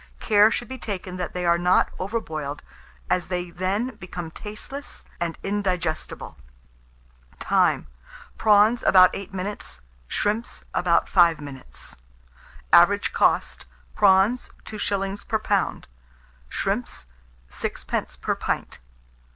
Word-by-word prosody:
Care 210 -1 +5
should 240 - -3
be 260 0 -7
taken 185 -4 -5
that 180 0 -4
they 180 0 -2
are 170 0 +4
not 180 +1 +3
over 205 +5 -1
boiled, 150 -6 -5 0.4
as 180 - 0
they 180 -1 -3
then 195 +8 -2
become 175 -3 -7
tasteless 215 - -8
and 170 -1 -2
indigestible. 185 -5 -2 1.0
Time. - - +2 0.5
Prawns, 215 +2 +4
about 185 -1 +7
8 200 0 -7
minutes; 190 - -5 0.3
shrimps, 215 - -2
about 175 -1 +2
5 170 -4 +5
minutes. 140 -3 -8 0.8
Average - - +6
cost, - - +1 0.3
prawns, 200 +5 +4 0.2
2s. 200 -2 -3
per 220 - +1
lb.; 215 - 0 0.7
shrimps, - - -2 0.5
6d. - - -4
per - - 0
pint. - - -3
190 Hz, 110 wpm, -24 LUFS, 175-210 Hz, 1.0 s, about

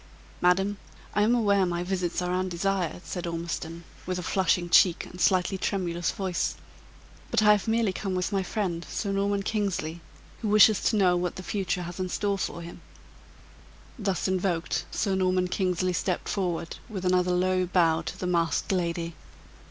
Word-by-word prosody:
"Madam, 195 +3 +3 0.4
I 205 - +2
am 225 +4 +4
aware 200 -4 +3
my 175 -1 -1
visits 180 -1 -1
are 180 0 -1
undesired," 185 -1 -1
said 175 -2 -4
Ormiston, 170 0 -4 0.2
with 185 -1 -1
a 180 - -4
flushing 180 -1 +1
cheek 175 0 +5
and, 180 - -9
slightly 185 +2 +2
tremulous 175 -3 -1
voice; 185 -3 -1 0.7
"but - - +2
I 210 - +7
have 210 0 +2
merely 225 -3 +2
come 190 0 -3
with 180 -1 -1
my 195 -1 +1
friend, 185 -3 -2
Sir 200 - -2
Norman 200 0 0
Kingsley, 190 -6 -2 0.4
who 225 - -2
wishes 210 0 +6
to - - +3
know 185 -4 +4
what 175 0 -1
the 185 - -7
future 190 -2 -2
has 175 +2 -7
in 185 0 -2
store 200 +1 -1
for 170 -2 -3
him." 170 - -10 1.2
Thus 195 -3 -1
invoked, 185 -2 -1
Sir 200 -3 -1
Norman 185 -1 +2
Kingsley 185 -1 0
stepped 180 0 -1
forward 175 -4 -2
with 190 -4 -5
another 180 0 +3
low 185 0 +1
bow 165 -3 +3
to - - -6
the - - -4
masked 170 -4 0
lady. 170 -2 -1
185 Hz, 170 wpm, -27 LUFS, 175-195 Hz, 1.2 s, I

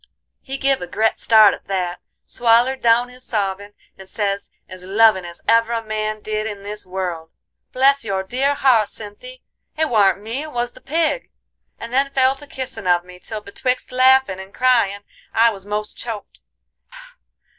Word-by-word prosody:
He 270 0 -6
give 270 0 +1
a 180 - -5
gret 220 +5 0
start 220 -2 +6
at - - -10
that, 180 -2 -2 0.3
swallered 240 +3 +2
down 235 +1 +3
his 250 0 -14
sobbin', 200 -1 -3 0.2
and 190 0 -12
sez 200 -2 -2 0.2
as 185 -1 -10
lovin' 195 -1 +4
as 170 0 -10
ever 230 +1 +3
a 230 -1 -2
man 215 0 -3
did 215 0 -3
in 205 -2 -7
this 205 -1 -7
world: 180 -3 -4 0.4
"'Bless 275 +1 +3
your 195 -3 -2
dear 265 +8 0
heart, 245 -7 +4
Cynthy, 365 - -11 0.3
it 315 -1 +1
warn't 205 -4 +3
me 230 +6 -4
it 310 0 -7
was 240 -1 -2
the - - -17
pig;' 325 - -1 0.5
and 230 +1 -8
then 275 +2 +2
fell 260 0 +4
to 290 +1 -13
kissin' 255 -7 -6
of 175 0 +3
me, 180 0 -13
till 215 +2 -6
betwixt 250 +5 -3
laughin' 255 -6 +4
and 190 +1 -11
cryin' 230 -6 +2 0.3
I 230 +1 +5
was 195 -2 -8
most 210 0 -4
choked. 225 -3 -7
220 Hz, 175 wpm, -20 LUFS, 200-255 Hz, 0.5 s, start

